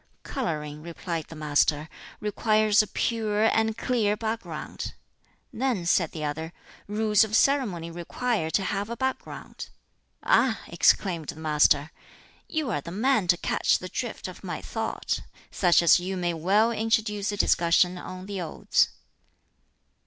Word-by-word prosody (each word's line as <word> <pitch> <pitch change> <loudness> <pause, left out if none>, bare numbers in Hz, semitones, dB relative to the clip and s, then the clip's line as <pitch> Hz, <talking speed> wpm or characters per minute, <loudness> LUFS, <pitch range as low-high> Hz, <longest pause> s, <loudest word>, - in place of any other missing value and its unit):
"Coloring," 150 - -4
replied 165 -1 -5
the 165 - -10
Master, 150 0 +1 0.3
"requires 215 0 +3
a 215 - -4
pure 215 -2 0
and 220 0 +1
clear 220 -4 +1
background." 225 0 -5 0.6
"Then," 240 -8 -1
said 170 -1 +2
the 155 - -6
other, 160 +3 -4 0.3
"rules 210 0 +3
of 215 0 -1
ceremony 210 - +2
require 175 +2 -2
to 195 - +1
have 200 +2 -2
a 235 - -5
background!" 265 0 -5 0.5
"Ah!" - - +3
exclaimed 170 -6 +2
the - - -5
Master, 150 -1 +3 0.6
"you 310 -6 -1
are 145 - -1
the 170 - -8
man 215 +1 +1
to 175 0 +4
catch - - +1
the - - -8
drift - - -4
of - - -10
my - - -4
thought. - - -3 0.3
Such 175 -2 +4
as 170 - +6
you 185 +2 -4
may 175 -1 -1
well 200 +8 +2
introduce 215 -2 0
a 205 - -4
discussion 175 0 +3
on 185 +1 -8
the 200 -2 -4
Odes." 165 - +1
195 Hz, 145 wpm, -26 LUFS, 170-220 Hz, 0.6 s, as